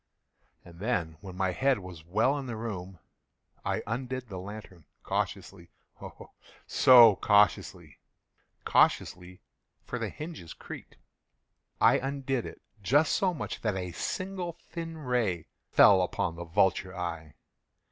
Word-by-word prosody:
And 85 -1 -14
then, 90 -8 -2
when 95 -2 -9
my 95 -1 +1
head 135 +7 +2
was 90 -4 -10
well 110 - +1
in 135 - -7
the 120 - -4
room, 95 -5 -6 0.7
I - - -2
undid 125 +1 -4
the 95 -2 -6
lantern 95 -4 -10 0.2
cautiously—oh, 85 -3 -6 0.3
so 120 -5 +7
cautiously—cautiously 90 -3 0 0.4
(for - - -4
the - - -2
hinges 155 - -8
creaked)—I - - -3
undid 135 -2 -2
it - - -12 0.2
just 145 +9 +3
so 190 -2 +2
much 145 - -5
that 105 -3 -1
a 90 -1 -4
single 185 - -4
thin 165 -1 -8
ray 120 - -1 0.2
fell 95 -2 +6
upon 90 -1 -2
the 85 +1 -7
vulture 95 +2 +1
eye. 85 -4 -5
105 Hz, 120 wpm, -29 LUFS, 90-130 Hz, 0.7 s, so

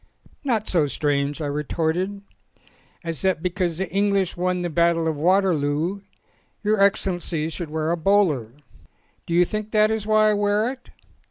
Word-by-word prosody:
"Not 230 -6 0
so 160 -5 +2
strange," 145 +2 -1
I - - -2
retorted, 165 +7 -2 0.8
"as 165 -2 -4
that 190 -4 0
because 180 -2 -1
the 190 +1 -2
English 200 -1 +1
won 180 0 -1
the 175 - -2
battle 170 0 +2
of 160 - 0
Waterloo 170 +1 +1 0.6
Your 210 -1 +2
Ex 200 +1 +3
cellency 170 -4 -2
should 170 -1 -5
wear 160 +1 -1
a 170 - 0
bowler." 165 - +2 0.8
"Do 170 - -1
you 180 +1 +5
think 215 +3 -4
that 215 0 +4
is 220 -1 -2
why 215 0 +4
I - - +2
wear 205 +3 +1
it?" 265 - -13
180 Hz, 165 wpm, -23 LUFS, 160-205 Hz, 0.8 s, you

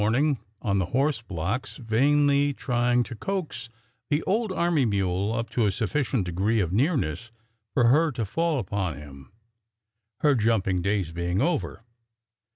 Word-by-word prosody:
ing 145 -1 +2 0.2
on 100 -4 +1
the 90 - 0
horse 140 -3 +1
blocks 100 +5 -4
vainly 140 +4 +2
trying 120 0 +1
to 110 - -8
coax 175 - -4 0.4
the 150 +2 +1
old 215 +2 0
army 170 -5 +1
mule 100 -2 0
up 115 0 -2
to 115 -4 +1
a - - +2
sufficient 125 +1 -1
degree 95 +6 0
of 90 -3 0
nearness 120 - 0 0.5
for 125 - +4
her 155 +5 +4
to 115 -4 -3
fall 165 - 0
upon 95 - -2
him, 70 -2 -12 0.9
her 150 -1 +4
jumping 105 -6 +1
days 95 -3 -1
being 85 +2 -1
over. 150 -6 -1
115 Hz, 150 wpm, -26 LUFS, 95-145 Hz, 0.9 s, for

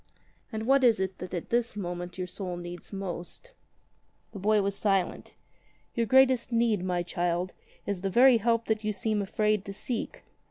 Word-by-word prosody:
"And 220 -1 -4
what 270 +2 +4
is 230 -5 +5
it 190 -1 -3
that 180 - -7
at 170 - -6
this 240 -2 +1
moment 175 -2 -5
your 185 - -2
soul 180 0 -5
needs 175 0 -8
most 195 - -6 0.4
?" - - -41
The 200 - -7
boy 210 +1 +3
was 200 0 0
silent. 195 -3 0 0.6
"Your 230 -1 0
greatest 260 0 +4
need, 230 -5 +2
my 180 -1 0
child, 175 +1 -1 0.3
is 200 -3 -3
the 195 - -1
very 245 +4 +6
help 230 +1 +1
that 220 -1 -1
you 215 0 0
seem 215 0 0
afraid 210 +1 +1
to 200 - -6
seek. 235 +2 -4
200 Hz, 185 wpm, -28 LUFS, 180-230 Hz, 0.6 s, very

